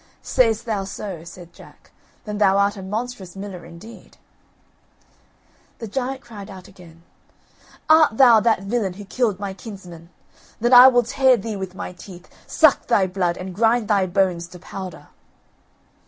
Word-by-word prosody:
"Say'st 230 Hz, -2 st, +1 dB
thou 210 Hz, -4 st, -2 dB
so," 190 Hz, -3 st, -7 dB
said 170 Hz, 0 st, -13 dB
Jack; -, -, -18 dB, 0.3 s
"then 210 Hz, -1 st, -5 dB
thou 195 Hz, -1 st, +3 dB
art 200 Hz, +1 st, +1 dB
a 195 Hz, -, -9 dB
monstrous 210 Hz, -1 st, -6 dB
miller 195 Hz, -2 st, -8 dB
indeed." 170 Hz, +7 st, -14 dB, 1.6 s
The 225 Hz, -, -7 dB
giant 265 Hz, +4 st, -4 dB
cried 215 Hz, -4 st, -11 dB
out 190 Hz, -2 st, -11 dB
again: 170 Hz, -3 st, -17 dB, 0.8 s
"Art 310 Hz, -7 st, +5 dB
thou 240 Hz, -4 st, +7 dB
that 220 Hz, -3 st, +1 dB
villain 200 Hz, -2 st, -2 dB
who 205 Hz, +2 st, -11 dB
killed 215 Hz, -2 st, -1 dB
my 200 Hz, -1 st, -5 dB
kinsmen? 180 Hz, -5 st, -12 dB, 0.5 s
Then 240 Hz, +3 st, +1 dB
I 250 Hz, +1 st, +10 dB
will 245 Hz, -2 st, +4 dB
tear 260 Hz, +1 st, +3 dB
thee 220 Hz, +1 st, -5 dB
with 190 Hz, -2 st, -7 dB
my 180 Hz, -, -7 dB
teeth, 180 Hz, -1 st, -13 dB, 0.2 s
suck 310 Hz, -3 st, +3 dB
thy 205 Hz, -5 st, +3 dB
blood, 180 Hz, -2 st, -2 dB
and 185 Hz, 0 st, -7 dB
grind 225 Hz, +2 st, +1 dB
thy 200 Hz, -3 st, +2 dB
bones 180 Hz, -2 st, 0 dB
to 180 Hz, -, -13 dB
powder." 185 Hz, +1 st, -9 dB
200 Hz, 155 wpm, -21 LUFS, 185-235 Hz, 1.6 s, I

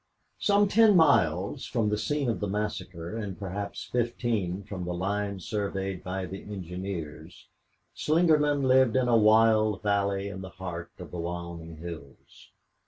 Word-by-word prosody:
6 -, -, -1 dB
Some 205 Hz, 0 st, +5 dB
ten 215 Hz, 0 st, +5 dB
miles 100 Hz, -, +3 dB
from 115 Hz, -4 st, 0 dB
the 105 Hz, -, 0 dB
scene 145 Hz, +1 st, -1 dB
of 115 Hz, -, 0 dB
the 105 Hz, -, -2 dB
massacre 100 Hz, -3 st, -4 dB
and 105 Hz, -5 st, -5 dB
perhaps 100 Hz, +1 st, -5 dB
fifteen 115 Hz, -6 st, -1 dB
from 95 Hz, -2 st, -6 dB
the 90 Hz, 0 st, -3 dB
line 100 Hz, +2 st, -2 dB
surveyed 95 Hz, -1 st, -3 dB
by 95 Hz, +1 st, -3 dB
the 95 Hz, +2 st, -7 dB
engineers, 90 Hz, -4 st, -7 dB, 0.5 s
Slingerland 150 Hz, -3 st, +3 dB
lived 130 Hz, -2 st, +4 dB
in 130 Hz, -1 st, +3 dB
a 120 Hz, -, +4 dB
wild 110 Hz, -1 st, +4 dB
valley 100 Hz, -1 st, +1 dB
in 95 Hz, -1 st, -6 dB
the 95 Hz, -, -7 dB
heart 90 Hz, -2 st, -6 dB
of -, -, -10 dB
the 90 Hz, -, -5 dB
Wyoming 85 Hz, -1 st, -6 dB
hills. 80 Hz, -4 st, -10 dB
100 Hz, 155 wpm, -28 LUFS, 90-115 Hz, 0.5 s, Some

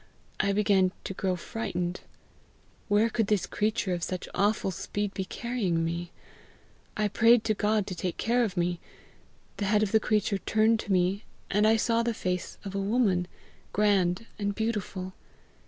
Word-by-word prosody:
I 200 Hz, -, +2 dB
began 195 Hz, -2 st, +3 dB
to -, -, -4 dB
grow 185 Hz, -1 st, -1 dB
frightened. 180 Hz, -2 st, -3 dB, 0.9 s
Where 210 Hz, +1 st, +4 dB
could 225 Hz, -2 st, 0 dB
this 200 Hz, -4 st, +1 dB
creature 210 Hz, -1 st, -1 dB
of 175 Hz, -, -3 dB
such 185 Hz, +1 st, -3 dB
awful 205 Hz, 0 st, +1 dB
speed 205 Hz, +3 st, -3 dB
be 190 Hz, 0 st, -3 dB
carrying 190 Hz, -7 st, -1 dB
me? 170 Hz, +1 st, -3 dB, 0.9 s
I 215 Hz, 0 st, +2 dB
prayed 230 Hz, +3 st, +5 dB
to 220 Hz, -, +1 dB
God 210 Hz, 0 st, +1 dB
to 195 Hz, -, -5 dB
take 180 Hz, 0 st, -3 dB
care 240 Hz, +2 st, +2 dB
of 195 Hz, -5 st, -3 dB
me. 175 Hz, 0 st, 0 dB, 0.8 s
The 205 Hz, -, -1 dB
head 210 Hz, +1 st, +3 dB
of 205 Hz, -, -1 dB
the 220 Hz, -, +5 dB
creature 210 Hz, -2 st, +1 dB
turned 220 Hz, +2 st, +2 dB
to 205 Hz, -, -4 dB
me, 185 Hz, +3 st, +2 dB, 0.3 s
and 210 Hz, +2 st, +4 dB
I 220 Hz, -, +5 dB
saw 230 Hz, +1 st, +2 dB
the 235 Hz, -1 st, -1 dB
face 180 Hz, -2 st, -3 dB
of 195 Hz, -, -5 dB
a 200 Hz, -, -1 dB
woman, 195 Hz, -4 st, +1 dB, 0.5 s
grand 200 Hz, -1 st, +2 dB
and 205 Hz, -1 st, -1 dB
beautiful. 200 Hz, -4 st, -3 dB
205 Hz, 170 wpm, -28 LUFS, 185-220 Hz, 0.9 s, prayed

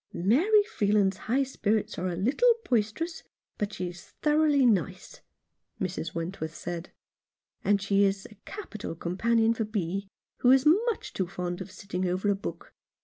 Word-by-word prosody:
"Mary 330 Hz, -, +4 dB
Freeland's 205 Hz, -, +1 dB
high 265 Hz, +4 st, +3 dB
spirits 220 Hz, -5 st, -1 dB
are 185 Hz, -, -1 dB
a 175 Hz, -, -2 dB
little 265 Hz, -, +3 dB, 0.2 s
bois 240 Hz, -3 st, +4 dB
terous, 330 Hz, +7 st, -5 dB, 0.4 s
but 210 Hz, 0 st, -1 dB
she 180 Hz, -3 st, -4 dB
is 175 Hz, 0 st, -11 dB, 0.2 s
thoroughly 300 Hz, -2 st, +4 dB
nice," 185 Hz, -4 st, 0 dB, 0.6 s
Mrs. 170 Hz, -3 st, -3 dB
Wentworth 165 Hz, -1 st, -4 dB
said; 175 Hz, 0 st, -6 dB, 0.7 s
"and 200 Hz, 0 st, +3 dB
she 200 Hz, 0 st, +2 dB
is 195 Hz, -1 st, +1 dB
a -, -, -12 dB
capital 220 Hz, -, -7 dB
companion 225 Hz, +7 st, +2 dB
for 225 Hz, -, -2 dB
Bee, 195 Hz, -2 st, -3 dB, 0.3 s
who 245 Hz, -, +3 dB
is 265 Hz, +2 st, +6 dB, 0.2 s
much 460 Hz, -, -2 dB
too 185 Hz, -, -1 dB
fond 175 Hz, 0 st, -4 dB
of 190 Hz, -, -7 dB
sitting 185 Hz, -2 st, -3 dB
over 185 Hz, +3 st, +1 dB
a -, -, +2 dB
book. 195 Hz, -, -7 dB
200 Hz, 160 wpm, -28 LUFS, 185-245 Hz, 0.7 s, is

